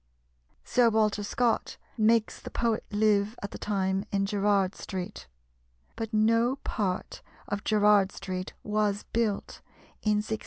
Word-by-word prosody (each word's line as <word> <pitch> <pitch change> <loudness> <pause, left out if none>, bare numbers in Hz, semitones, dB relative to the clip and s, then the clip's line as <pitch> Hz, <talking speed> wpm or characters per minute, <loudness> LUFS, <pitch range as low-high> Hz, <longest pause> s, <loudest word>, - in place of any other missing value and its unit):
Sir 245 -2 +3
Walter 215 -2 +2
Scott 230 +3 0 0.2
makes 225 0 +2
the - - -8
poet 230 -2 0
live 210 +1 +2
at 200 - -4
the - - -8
time 195 -1 0
in 195 0 +1
Gerard 200 -1 +1
Street; 190 - -6 0.7
but 225 -1 -4
no 230 +3 +3
part 190 -5 -2 0.3
of 205 +1 -3
Gerard 210 -2 +4
Street 185 -1 -5
was 210 -1 0
built 225 -3 -1 0.4
in 210 - +2
1679. 215 +1 -2
210 Hz, 130 wpm, -28 LUFS, 200-220 Hz, 0.7 s, Gerard